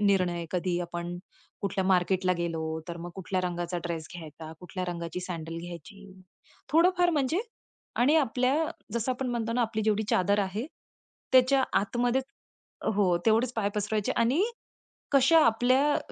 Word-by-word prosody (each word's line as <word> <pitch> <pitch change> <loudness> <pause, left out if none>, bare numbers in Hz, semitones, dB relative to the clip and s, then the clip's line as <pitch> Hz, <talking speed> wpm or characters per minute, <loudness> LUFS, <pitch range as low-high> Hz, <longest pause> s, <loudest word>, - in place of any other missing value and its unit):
निर्णय 180 -4 +2
कधी 180 -1 0
आपण 175 0 -4 0.5
कुठल्या 195 -1 -1
मार्केटला 185 0 +2
गेलो, 165 -2 -2 0.3
तर 170 - -5
मग 175 +1 -6
कुठल्या 185 0 -2
रंगाचा 175 0 -2
ड्रेस 165 -2 -3
घ्यायचा, 160 -1 -9
कुठल्या 185 +1 -5
रंगाची 170 +1 -5
सॅडल 165 -2 -5
घ्यायची, 175 +4 -10 0.6
थोडं-फार 355 +2 +4
म्हणजे 305 +3 +1 0.6
आणि 285 +6 +4
आपल्या 260 -1 +2 0.4
जसं 235 +2 0
आपण 255 0 -3
म्हणतो 230 -1 -2
ना 245 - +2
आपली 220 -1 -1
जेवढी 215 0 +2
चादर 200 +3 +2
आहे, 205 +7 -3 0.7
त्याच्या 260 +1 +5 0.2
आतमध्येच 245 +5 0 0.7
हो 185 -4 +3
तेवढेच 230 +3 +3
पाय 215 -3 0
पसरवायचे 210 0 0
आणि, 255 +10 +3 0.7
कशा 280 +4 +6
आपल्या 255 +6 +3
200 Hz, 140 wpm, -28 LUFS, 175-250 Hz, 0.7 s, कशा